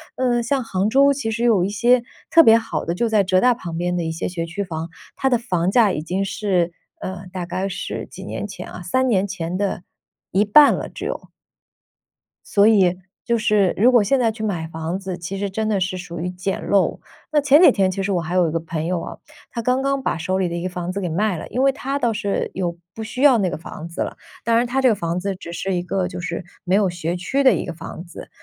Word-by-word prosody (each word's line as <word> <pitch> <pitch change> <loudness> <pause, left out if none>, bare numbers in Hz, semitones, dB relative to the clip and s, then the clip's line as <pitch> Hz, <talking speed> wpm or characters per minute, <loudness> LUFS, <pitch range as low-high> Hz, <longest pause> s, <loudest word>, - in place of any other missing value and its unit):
呃， 245 -2 +1
像 260 +2 0
杭 195 -2 0
州 275 +4 +5
其 270 -5 -3
实 230 +2 -2
有 220 -7 +4
一 190 - 0
些 240 +4 +3 0.3
特 330 - +8
别 225 -5 +7
好 225 0 -3
的， 170 - -2
就 235 +6 +1
在 215 -2 +3
浙 185 0 +3
大 250 0 +5
旁 170 -8 -6
边 175 +1 -1
的 175 - -1
一 160 - -2
些 160 - -3
学 170 -2 -3
区 175 +5 -4
房， 165 -2 -5 0.3
它 265 - +1
的 245 - +3
房 185 -7 -1
价 220 -2 +4
已 150 - -2
经 185 +5 -2
是 185 -4 0 0.3
呃， 190 0 -6
大 180 -1 -4
概 185 +2 -3
是 185 - -5
几 - - -10
年 - - -5
前 - - -8
啊？ - - -8
3 260 0 +1
年 200 -5 +2
前 180 -3 -4
的 195 -2 -2 0.5
一 195 - +3
半 280 +8 +7
了， - - -4
只 - - -7
有。 - - -5 1.2
所 200 0 +4
以， 190 -5 +4 0.3
就 235 - +2
是 210 -4 +2
如 240 +6 +5
果 240 -3 +6
现 210 +7 +2
在 235 -3 +2
去 220 0 -10
买 180 -7 -2
房 160 +2 -4
子， 190 -2 -5
其 175 +3 -5
实 200 +1 -2
真 215 +3 -2
的 205 -3 0
是 185 0 -1
属 175 -2 -7
于 175 +2 -2
捡 185 +2 -4
漏。 200 -2 +2 0.3
那 295 - +4
前 285 +2 +6
几 350 - +8
天， 190 -2 +2
其 195 - -3
实 195 +1 -1
我 175 - +1
还 170 +2 -4
有 180 -2 +4
一 - - -2
个 165 - +1
朋 160 -1 -4
友 175 0 -1
啊， - - -7 0.3
他 235 - -3
刚 250 +3 +1
刚 275 0 0
把 260 - -1
手 185 +3 -1
里 185 - +1
的 170 - -4
一 170 - -4
个 185 - -2
房 180 -1 -5
子 200 - -3
给 180 - -2
卖 190 +3 0
了， - - -6
因 250 - -1
为 270 0 +4
他 275 +1 -3
倒 235 -4 +1
是 205 -2 -2
有 175 -2 -2 0.2
不 225 - -5
需 235 +3 -5
要 275 -4 +7
那 190 -3 +1
个 - - -4
房 165 0 -9
子 170 - -10
了。 - - -2 0.3
当 230 0 +3
然 235 +1 +3
他 260 +2 0
这 260 - +5
个 230 - +4
房 170 -2 -2
子 195 +1 -3
只 175 -2 -9
是 190 +3 -3
一 175 - -1
个 180 +1 -1
就 180 -1 -6
是 170 +1 -4 0.2
没 180 - -1
有 200 -1 +4
学 175 0 -3
区 270 +11 0
的 265 - +6
一 - - -2
个 175 - -5
房 170 +1 -8
子， 170 - -11
195 Hz, 280 characters per minute, -21 LUFS, 175-230 Hz, 1.2 s, 特